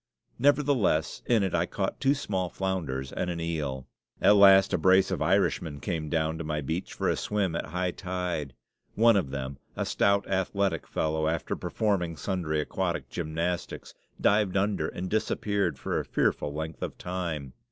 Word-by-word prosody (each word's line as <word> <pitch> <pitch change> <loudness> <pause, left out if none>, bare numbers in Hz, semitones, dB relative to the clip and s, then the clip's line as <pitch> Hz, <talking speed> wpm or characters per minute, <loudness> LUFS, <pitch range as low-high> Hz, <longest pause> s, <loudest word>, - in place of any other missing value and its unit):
Nevertheless, 135 - +2
in 115 -4 +3
it 95 - -1
I 85 0 +1
caught 95 -1 -3
two 140 +1 +3
small 95 -10 -2
flounders 80 -10 -3
and 90 - -2
an 85 -1 -3
eel. 75 -6 -3 0.3
At 105 - +6
last 95 -1 +7
a - - +2
brace 95 +3 +4
of 95 - -2
Irishmen 80 -3 +1
came 80 -2 -3
down 80 0 0
to - - -3
my 75 -1 -2
beach 80 +6 -3
for - - -2
a - - +2
swim 100 -5 -1
at - - -3
high 90 +1 -1
tide. 90 -7 -4 0.4
One 115 +1 +5
of 90 -9 +1
them, 70 0 -5 0.2
a - - -1
stout, 100 0 +2
athletic 95 -2 0
fellow, 80 0 0
after 80 0 -1
performing 90 -3 -1
sundry 80 -1 -1
aquatic - - -2
gymnastics, 85 +3 -3 0.3
dived 100 -2 +3
under 100 -5 +1
and 90 - -5
disappeared 100 0 0
for - - -2
a - - -2
fearful 75 - 0
length 80 +1 -5
of - - -4
time. 85 -7 -4
90 Hz, 170 wpm, -28 LUFS, 80-100 Hz, 0.4 s, last